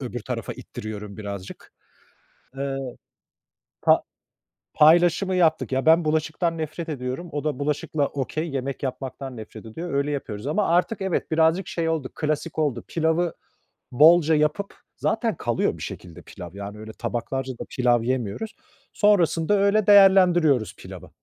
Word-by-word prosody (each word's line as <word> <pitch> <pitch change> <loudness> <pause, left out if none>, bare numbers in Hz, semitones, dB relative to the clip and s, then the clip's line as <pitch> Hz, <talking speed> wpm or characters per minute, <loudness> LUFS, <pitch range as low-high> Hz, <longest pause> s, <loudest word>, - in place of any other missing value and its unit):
öbür 120 -2 -5
tarafa - - -4
ittiriyorum 105 -1 -8
birazcık. 100 -3 -8 0.9
Eee, 135 0 -2 1.0
pa - - +4 0.7
paylaşımı 175 +4 +4
yaptık. 160 -6 +2
Ya, 130 +2 0
ben 165 +1 +6
bulaşıktan 160 +2 0
nefret 160 +2 -5
ediyorum. 135 +3 -4
O 145 0 -3
da 150 -4 -1
bulaşıkla 145 0 -1
okey, 150 +4 -3
yemek 135 0 -4
yapmaktan 130 0 -5
nefret 110 0 -10
ediyor. 165 +9 -6
Öyle 140 +1 0
yapıyoruz 130 -5 -5
ama 195 +6 0
artık 180 +5 +1
evet 190 -3 -2
birazcık 160 +3 +2
şey 165 -1 -2
oldu 160 -5 -2
klasik 155 +1 -3
oldu. 140 -6 0
Pilavı 165 +1 0 0.6
bolca 160 +4 +6
yapıp 150 +7 0 0.2
zaten - - 0
kalıyor - - -1
bir - - -12
şekilde 90 -1 -8
pilav. 90 -3 -10
Yani, 100 +1 -8
öyle 110 +1 -8
tabaklarca 130 +2 -3
da 120 - -7
pilav 120 -2 +2
yemiyoruz. 130 - -3 0.4
Sonrasında 200 -5 +3
öyle 200 +1 +2
değerlendiriyoruz 180 - +5
pilavı. - - -11
150 Hz, 140 wpm, -24 LUFS, 125-170 Hz, 1.0 s, ben